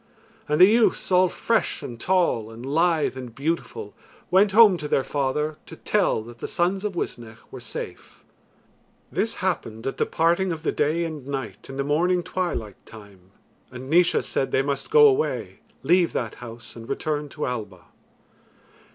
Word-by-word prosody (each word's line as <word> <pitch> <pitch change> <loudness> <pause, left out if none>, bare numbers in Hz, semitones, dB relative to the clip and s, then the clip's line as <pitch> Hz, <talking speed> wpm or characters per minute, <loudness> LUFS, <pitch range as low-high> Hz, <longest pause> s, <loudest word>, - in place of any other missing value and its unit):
And 150 - +1
the 185 - +10
youths 220 -1 +2
all 185 0 +5
fresh 230 +5 -1
and 120 -2 -7
tall 170 - +1
and 115 +2 -10
lithe 160 +1 +1
and 125 -3 -8
beautiful, 165 - -3 0.4
went 195 +2 +5
home 215 -2 +7
to 150 -2 -5
their 135 - +1
father 150 +3 -1
to - - -10
tell 190 - 0
that 120 +1 -13
the - - -4
sons 185 +3 0
of 210 -3 -3
Uisnech 115 -8 -5
were - - -8
safe. - - -9 0.9
This - - -1
happened 110 0 -2
at 135 - -3
the - - 0
parting 170 +3 +1
of 160 -1 -5
the - - +1
day 155 +3 0
and 155 -5 -7
night 135 -4 -6
in 135 - -7
the 140 - 0
morning 175 +5 +1
twilight 175 - -4
time, 100 -4 -15 0.4
and 130 +2 -9
Naois 175 +1 +4
said 135 - -1
they 135 - +2
must 140 -1 -3
go 450 0 +7
away, 425 +2 -1 0.2
leave 175 +4 +3
that 115 -4 -2
house, 115 -1 -10
and 115 0 -10
return 150 -1 -2
to 150 - -4
Alba. 105 -8 -5
150 Hz, 170 wpm, -24 LUFS, 120-180 Hz, 0.9 s, the